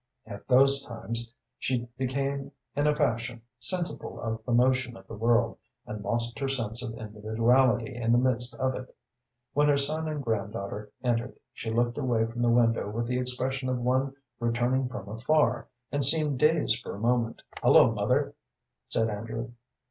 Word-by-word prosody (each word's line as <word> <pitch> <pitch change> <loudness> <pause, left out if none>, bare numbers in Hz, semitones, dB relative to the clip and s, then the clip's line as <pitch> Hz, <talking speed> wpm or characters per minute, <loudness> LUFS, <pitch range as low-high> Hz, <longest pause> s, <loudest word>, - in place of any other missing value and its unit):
At 100 -2 -10
those 135 +2 +5
times 115 -1 -4 0.3
she 125 -2 -1
became 135 +2 -2 0.2
in 145 +1 +2
a 150 - +3
fashion 120 -5 -1 0.2
sensible 175 +6 0
of 110 -1 -4
the - - -1
motion 125 0 +2
of - - -15
the - - -10
world, 115 +2 +1 0.3
and 105 -1 -6
lost 115 +4 -1
her 135 -1 -1
sense 115 -3 -2
of 115 -3 -5
individuality 115 +3 +1
in 115 -1 0
the 120 - +5
midst 125 -1 +1
of 130 +1 0
it. 130 0 -8 0.6
When 145 +1 +3
her 145 -1 +4
son 155 +3 +1
and 150 -2 -3
granddaughter 105 -2 -3
entered 120 0 -1 0.2
she 115 - -6
looked 120 +3 0
away 120 -5 +1
from 115 +1 -5
the 120 - +3
window 115 -3 +3
with 115 +3 -2
the 125 +1 -1
expression 130 +1 -1
of 130 - 0
one 130 +2 0 0.2
returning 120 +2 0
from 120 -6 -7
afar, 125 +3 +1 0.2
and 145 -1 0
seemed 150 -1 +5
dazed 150 -7 +3
for - - -6
a - - -8
moment. 115 0 0 0.2
"Hullo, - - +6
mother!" - - 0 0.6
said 115 - +1
Andrew. 115 +2 -5
120 Hz, 170 wpm, -28 LUFS, 115-130 Hz, 0.6 s, Hullo